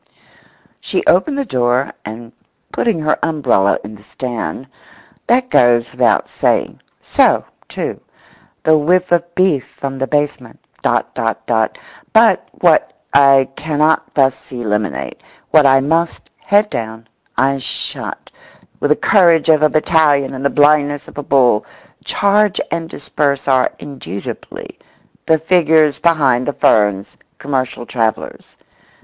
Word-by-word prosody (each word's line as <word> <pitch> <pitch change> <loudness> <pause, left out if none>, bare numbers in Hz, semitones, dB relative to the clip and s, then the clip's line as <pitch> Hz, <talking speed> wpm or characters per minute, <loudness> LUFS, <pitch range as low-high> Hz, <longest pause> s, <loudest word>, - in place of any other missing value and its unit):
She - - -3
opened 295 -4 +2
the 280 - -2
door, 125 - 0
and, 115 +2 -9 0.4
putting 230 -7 0
her 150 0 0
umbrella 130 -11 +1
in 105 +2 -9
the 105 - -14
stand—that 130 - -5
goes 120 -1 +3
without - - +1
saying; - - -1 0.2
so, - - +2 0.2
too, - - -5 0.6
the 155 -1 +4
whiff 180 +4 +1
of 175 0 0
beef 185 -8 +1
from 135 -1 -7
the 135 - -2
basement; 145 -5 -3 0.2
dot, - - -1
dot, - - -3
dot. - - 0 0.4
But - - +4
what - - +3 0.2
I 135 -1 +5
cannot 155 0 0
thus 135 -1 0
eliminate, 105 -5 -3 0.3
what 150 -2 +5
I 135 0 +4
must, 165 +4 -2
head 205 +1 +1
down, 110 0 -6 0.3
eyes 135 0 +1
shut, - - -5 0.5
with 145 - -1
the 150 - +4
courage 170 -5 +3
of 155 -2 +4
a 155 - +4
battalion 150 -3 +2
and 130 0 -6
the 140 - +2
blindness 145 -1 +2
of - - -10
a - - -2
bull, 125 -6 +2 0.4
charge 205 0 +1
and 165 -1 -3
disperse 140 -3 -2
are, 130 -2 +2
indubitably, 125 - -9 0.5
the 160 - +4
figures 160 -2 +2
behind 140 -7 +2
the 145 - -1
ferns, 105 -5 +1 0.2
commercial 130 -3 -3
travellers. 110 -3 -3
140 Hz, 130 wpm, -16 LUFS, 125-160 Hz, 0.6 s, I